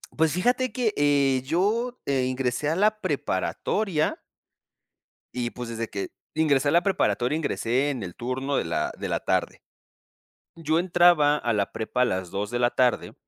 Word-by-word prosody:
Pues 160 -1 +2
fíjate 245 +8 +1
que, 235 -5 0
eh, 140 -2 +2
yo, 220 - 0
eh 135 -2 +1
,ingresé 130 +2 -1
a 160 - 0
la 215 +3 +2
preparatoria 155 - -1 1.2
y, 120 -1 -1
pues, 125 -1 -7
desde 115 -1 -4
que 100 - -4 0.2
ingresé 145 -3 +2
a - - +1
la 170 - +5
preparatoria, 150 -8 +1
ingresé 140 -3 0
en 130 -4 -3
el 90 - -7
turno 130 +3 -3
de - - +1
la 80 - -2
de - - -4
la - - 0
tarde. - - -1 0.9
Yo 160 0 0
entraba 175 -4 +4
a 120 -5 -1
la 100 -2 -1
prepa 115 +3 -1
a - - +6
las 95 -6 -2
2 105 +2 -3
de 120 - -1
la 120 0 +3
tarde 125 -1 +1
145 Hz, 170 wpm, -25 LUFS, 120-175 Hz, 1.2 s, a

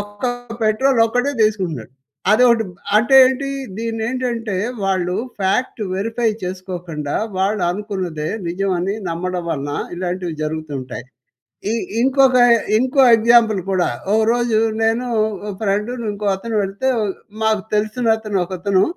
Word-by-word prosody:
ఒక్క 205 +4 -5 0.4
పెట్రోలొక్కటే 245 +3 +2
తీసుకుంటున్నాడు. 180 - -1 0.4
అదొకటి 235 0 +5 0.3
అంటే 235 +5 +3
ఏంటి? 270 +1 -1 0.3
దీన్నేంటంటే 230 -1 -2 0.3
వాళ్ళు 185 -2 0 0.2
ఫాక్ట్ 220 +5 0
వెరిఫై 225 +4 0
చేసుకోకండా, 180 -5 -5 0.2
వాళ్ళనుకున్నదే 190 -4 -1 0.2
నిజమని 185 +2 -1
నమ్మడం 180 +1 -3
వలన 145 -2 -3 0.2
ఇలాంటివి 180 -1 -3
జరుగుతుంటాయి. 150 -6 -5 0.7
ఈ - - +1 0.3
ఇంకొక 265 -1 +4 0.4
ఇంకో 260 +3 +2 0.2
ఎగ్జాంపుల్ 225 -3 +4
కూడా, 185 -2 +1 0.2
ఓ - - +1 0.2
రోజు 240 -2 +1 0.2
నేను 225 +3 +1 0.3
ఒక 205 +1 -6
ఫ్రెండును 215 +4 -1
ఇంకో 205 0 -3
అతను 225 +2 -4
వెళ్తే, 200 +7 -1 0.5
మాకు 215 -3 +2
తెలిసిన 220 +3 0
అతను, 215 -3 -2
ఒకతను 190 +1 +1
205 Hz, 110 wpm, -19 LUFS, 180-230 Hz, 0.7 s, అదొకటి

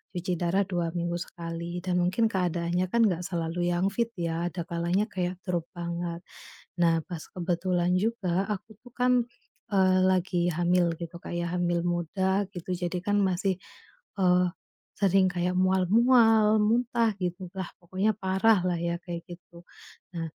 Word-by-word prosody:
cuci 180 +1 -2
darah 180 +3 +2
2 175 -2 -2
minggu 170 0 -1
sekali 170 0 -5
dan 180 -1 0
mungkin 185 +6 +2
keadaannya 175 0 0
kan 235 0 +4
gak 175 -4 0
selalu 175 0 -2
yang 175 +2 +1
fit 235 +2 0
ya 170 0 -2
ada 175 -1 -4
kalanya 170 +5 0
kayak 180 0 -2
drop 175 -3 -2
banget. 170 0 -4 0.6
Nah 165 -1 +4
pas 170 -4 -6
kebetulan 180 0 0
juga, 195 -4 0
aku 210 +1 -5
tuh 245 - -14
kan, 250 0 +2 0.6
eee, 185 -1 +4
lagi 185 -1 +2
hamil 175 +1 +2
gitu, 170 0 -7
kayak 175 0 -3
hamil 175 -1 +1
muda 190 +3 0
gitu. 175 0 -7
Jadi 180 0 -2
kan 205 +1 +1
masih, 190 0 +1 0.6
eee, 180 -1 +4 0.5
sering 195 -1 +4
kayak 180 0 -1
mual-mual, 215 +4 +4
muntah 230 0 +2
gitulah 180 +1 -4
pokoknya 185 +4 0
parahlah 190 -2 +2
ya, 170 0 -1
kayak 170 -2 -6
gitu. 175 0 -12 0.5
Nah 165 -1 -2
180 Hz, 145 wpm, -28 LUFS, 175-190 Hz, 0.6 s, kan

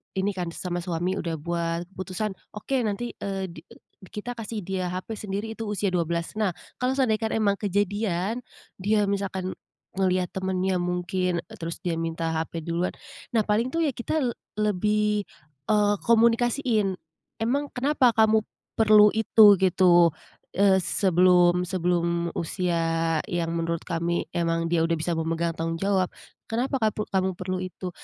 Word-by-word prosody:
ini 195 +2 +1
kan 180 -2 -4
sama 175 -1 -3
suami 175 +2 -2
udah 165 -1 -2
buat 170 +1 -2
keputusan, 190 +2 -4 0.2
"Oke 265 +6 -1
nanti, 215 +4 -2
eee, 195 -2 -3
di, - - -10
e - - -16 0.3
kita 220 +5 -6
kasih 220 -2 -5
dia 185 0 -2
HP 185 +5 -5
sendiri 205 +2 -4
itu 225 -1 -5
usia 205 -2 -1
12. 170 -1 -1
Nah, 195 -6 +1 0.2
kalau 255 +1 +1
seandaikan 220 -4 +1
emang 200 -2 +1
kejadian, 205 +1 -1 0.4
dia 210 +2 +2
misalkan 190 -2 -2 0.5
ngelihat 185 -1 +1
temennya 190 -1 -1
mungkin, 180 0 -1 0.2
terus 165 0 -6
dia 165 -2 -1
minta 165 0 -2
HP 160 0 -3
duluan, 170 +2 -1 0.4
nah 220 - +4
paling 215 +4 +1
tuh 330 - +1
ya 295 - +2
kita 270 +5 -2 0.3
lebih 210 0 +1 0.8
komunikasiin. 230 -2 +3 0.5
"Emang 280 +5 0
kenapa 260 -2 +3
kamu 220 -1 +4 0.4
perlu 210 -1 +7
itu?" 215 -2 +6
gitu, 175 -3 +5 0.4
eee, 195 -1 +5
sebelum, 180 -1 +3
sebelum 170 -1 0
usia 165 -1 0
yang 170 -2 -1
menurut 165 0 -1
kami 170 0 -1
emang 165 -1 0
dia 170 -1 +3
udah 165 - 0
bisa 170 +2 -1
memegang 165 +1 -1
tanggung 165 0 -2
jawab, 195 -2 +2 0.4
"Kenapa 255 +4 0
kapu 215 -2 0
kamu 190 -1 +1
perlu 185 +1 -3
itu?" 185 0 -5
190 Hz, 145 wpm, -26 LUFS, 170-215 Hz, 0.8 s, perlu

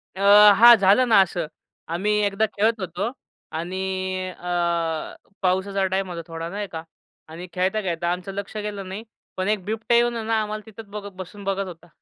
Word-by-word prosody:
अ, - - -9 0.4
हां, 235 +4 +9
झालं 205 +6 +4
ना 215 - +7
असं. 175 -3 -1 0.4
आम्ही 180 +6 -1
एकदा 205 +2 +1
खेळत 220 +2 +2
होतो 185 +5 -3 0.5
आणि 185 +1 -3
अ, 170 -3 -2 0.3
पाऊसाचा 190 +1 +1
टाईम 190 0 -1
होता 170 -1 -5
थोडा 165 0 -5
नाही 205 +2 -4
का? 160 -1 -6 0.4
आणि 165 +3 -9
खेळता-खेळता 180 -2 -1
आमचं 180 +2 -4
लक्ष 200 +2 -6
गेलं 205 -2 -5
नाही. 200 +4 -6 0.3
पण 185 - -1
एक 210 -3 0
बिबट्या 225 +2 +1
येवून 240 0 +2
आहे 225 - -4
ना 225 0 +1
आम्हाला 215 0 -4
तिथेच 220 0 -11
बघत 205 0 -7
बसून 190 +2 -9
बघत 195 0 -1
होता. 175 -1 -11
190 Hz, 175 wpm, -23 LUFS, 180-210 Hz, 0.5 s, हां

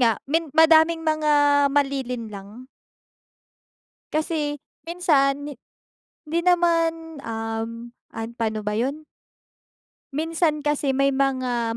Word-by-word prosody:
nga, 230 -3 +3
min 320 +3 -1
madaming 320 +1 +5
mga 310 -1 +1 0.4
malilinlang. 250 -5 -3 1.5
Kasi 310 -1 -1 0.3
minsan 290 -5 +1
hi - - -10 0.7
di 330 +3 0
naman, 330 -2 +1
um, 225 +1 -5 0.2
an 225 0 -5
pa'no 220 -2 -2
ba 210 0 -3
yun? 275 +6 -2 1.1
Minsan 315 0 -1
kasi 290 -2 0
may 275 0 +2
mga 255 -4 0
280 Hz, 95 wpm, -23 LUFS, 235-320 Hz, 1.5 s, madaming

